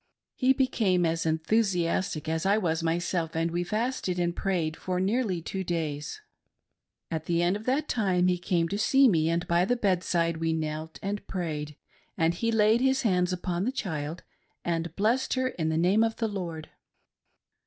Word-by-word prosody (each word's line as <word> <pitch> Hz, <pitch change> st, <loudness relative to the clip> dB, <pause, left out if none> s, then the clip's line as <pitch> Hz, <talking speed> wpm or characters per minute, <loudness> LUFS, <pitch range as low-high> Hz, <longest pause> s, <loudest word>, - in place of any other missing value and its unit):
He 255 Hz, 0 st, +3 dB
became 220 Hz, -9 st, +2 dB
as 165 Hz, 0 st, 0 dB
enthusiastic 170 Hz, -1 st, 0 dB
as 160 Hz, 0 st, -1 dB
I 200 Hz, +2 st, +3 dB
was 165 Hz, -5 st, 0 dB
myself, 165 Hz, 0 st, -1 dB
and 165 Hz, +1 st, 0 dB
we 175 Hz, +1 st, -1 dB
fasted 215 Hz, -1 st, -2 dB
and 175 Hz, -1 st, 0 dB
prayed 170 Hz, -5 st, -1 dB
for 180 Hz, +1 st, -3 dB
nearly 195 Hz, -3 st, 0 dB
two 190 Hz, +2 st, -3 dB
days. 160 Hz, -, -3 dB, 0.9 s
At 160 Hz, -1 st, -3 dB
the 170 Hz, 0 st, +1 dB
end 175 Hz, +3 st, +2 dB
of 210 Hz, +2 st, -7 dB
that 280 Hz, +4 st, +1 dB
time 185 Hz, -6 st, +1 dB
he 180 Hz, -1 st, +1 dB
came 175 Hz, -2 st, +1 dB
to 200 Hz, -, -2 dB
see 270 Hz, +4 st, +5 dB
me, 165 Hz, -7 st, +3 dB
and 170 Hz, +1 st, -1 dB
by 170 Hz, +1 st, +3 dB
the 245 Hz, +6 st, +1 dB
bedside 175 Hz, -5 st, +1 dB
we 165 Hz, 0 st, 0 dB
knelt 155 Hz, 0 st, -4 dB
and 200 Hz, +1 st, -3 dB
prayed, 150 Hz, -5 st, -4 dB, 0.4 s
and 165 Hz, +1 st, +2 dB
he 230 Hz, +6 st, -1 dB
laid 220 Hz, +1 st, +4 dB
his 265 Hz, 0 st, +2 dB
hands 180 Hz, -4 st, +2 dB
upon 180 Hz, 0 st, -2 dB
the 245 Hz, -, 0 dB
child 160 Hz, -, -4 dB, 0.4 s
and 165 Hz, -1 st, -2 dB
blessed 230 Hz, +8 st, +1 dB
her 255 Hz, 0 st, +1 dB
in 160 Hz, -9 st, -2 dB
the 160 Hz, -, 0 dB
name 185 Hz, +6 st, +4 dB
of 225 Hz, 0 st, 0 dB
the 225 Hz, -, -1 dB
Lord. 170 Hz, -6 st, -5 dB
180 Hz, 180 wpm, -28 LUFS, 165-210 Hz, 0.9 s, see